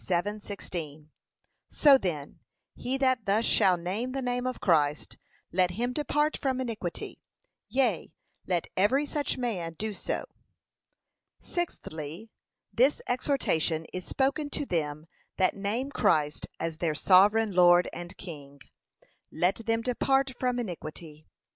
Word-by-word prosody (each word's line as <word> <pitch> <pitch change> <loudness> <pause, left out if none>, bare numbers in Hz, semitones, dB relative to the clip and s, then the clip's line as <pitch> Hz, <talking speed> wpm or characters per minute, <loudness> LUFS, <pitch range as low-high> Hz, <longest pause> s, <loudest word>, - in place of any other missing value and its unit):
7:16) 175 -5 -4 0.6
So 285 -2 +6
then, 165 - -3 0.3
he 260 +2 -2
that 260 -5 +1
thus 210 +4 +2
shall 185 -2 +4
name 200 +9 -3
the 270 - -2
name 245 0 -1
of 255 - -3
Christ, 150 -4 +1 0.3
let 180 +1 +3
him 240 +7 -2
depart 295 +2 +1
from 260 -2 -1
iniquity: 225 -9 -5 0.5
yea, 250 -12 +1 0.4
let 175 -3 0
every 255 +10 +3
such 290 -1 -1
man 185 -10 -3
do 215 +4 -3
so. - - -3 1.1
Sixthly, 185 - -5 0.4
This 260 +5 +3
exhortation 170 - 0
is 185 - -4
spoken 280 - 0
to 290 - -2
them 155 - -2 0.3
that 185 -1 +2
name 220 +8 -2
Christ 150 - +1
as 165 -1 -3
their 160 -2 -1
Sovereign 205 +6 +5
Lord 175 -1 +6
and 175 +1 -8
King: 145 -6 -10 0.7
let 180 +4 +1
them 225 0 +1
'depart 270 +2 +1
from 250 -1 0
iniquity.' 160 -7 -7
200 Hz, 125 wpm, -28 LUFS, 170-255 Hz, 1.1 s, So